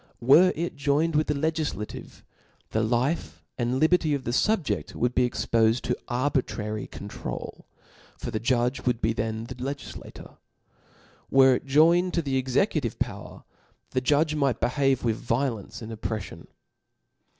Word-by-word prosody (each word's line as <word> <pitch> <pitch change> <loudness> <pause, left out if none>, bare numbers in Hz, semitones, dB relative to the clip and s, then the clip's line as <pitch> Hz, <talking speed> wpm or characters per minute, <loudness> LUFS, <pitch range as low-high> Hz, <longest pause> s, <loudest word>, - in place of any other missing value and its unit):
Were 155 +10 +6
it 170 +1 -3
joined 145 +3 +1
with 155 +1 +2
the 150 - 0
legUtative, 155 -7 -3 0.5
the 110 - +1
Kfe^ 125 +8 0 0.3
and 125 +2 0
li 155 - +5
berty 160 -4 +2
of 135 - -5
the 120 - -2
fubjeft 150 - 0
wouhibe 125 +1 +1
expofed 115 0 +1
to 125 - -1
arbitrary 120 -5 -1
controul 100 -11 -7
i - - -37 0.3
for - - -5
the 110 - -2
judge 125 +2 0
would 120 -2 +2
be 115 -1 +1
then 110 0 -3
the 120 - -7
legtlla 135 +3 -6
tor. - - -13 0.9
Were 135 -1 +6
it 125 - -3
joined 170 +6 +4
to 170 - +1
the 135 -2 0
executive 130 - 0
power, - - -5 0.5
the 130 - 0
judge 150 +4 +2
m^ht 140 -5 +1
behave 135 0 +1
with 115 -2 -1
vioIeoQe 115 -3 -2
and 110 - -7
oppreOion. 105 -6 -5
130 Hz, 150 wpm, -26 LUFS, 115-150 Hz, 0.9 s, Were